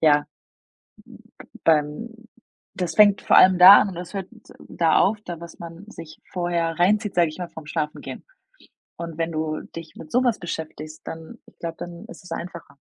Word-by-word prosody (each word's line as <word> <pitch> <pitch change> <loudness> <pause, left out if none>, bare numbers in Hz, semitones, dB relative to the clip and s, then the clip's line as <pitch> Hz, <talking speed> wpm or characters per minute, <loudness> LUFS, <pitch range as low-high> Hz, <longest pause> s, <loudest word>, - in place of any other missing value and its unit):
ja, 150 -2 +4 1.3
b - - -15
beim 150 +7 +1 0.7
das 180 -2 -3
fängt 205 -1 +6
vor - - +4
allem 185 -1 +7
da 185 +3 +10
an - - 0
und 180 - -10
es 175 +2 -7
hört 195 -2 -4 0.4
da 165 -2 +2
auf, 210 +3 +3
da 170 -2 -7
was 170 -1 -11
man 170 +3 -10
sich 155 -6 -11
vorher 170 -2 -1
reinzieht, 205 +4 +2
sage 175 -2 +3
ich 155 - -10
mal, 180 -1 -5
vorm 160 - -11
Schlafengehen. 150 -1 -5 0.7
Und 165 -2 -7
wenn 165 0 -2
du 155 -1 -3
dich 165 -1 -9
mit 155 - -11
so 250 +2 +2
was 240 -4 +1
beschäftigst, 155 -3 -7
dann 160 0 -9
ich - - -21
glaube, 165 -1 -5
dann 175 +3 -8
ist 240 - -12
es 180 - -13
einfacher. 170 -3 -7
170 Hz, 185 wpm, -23 LUFS, 160-185 Hz, 1.3 s, da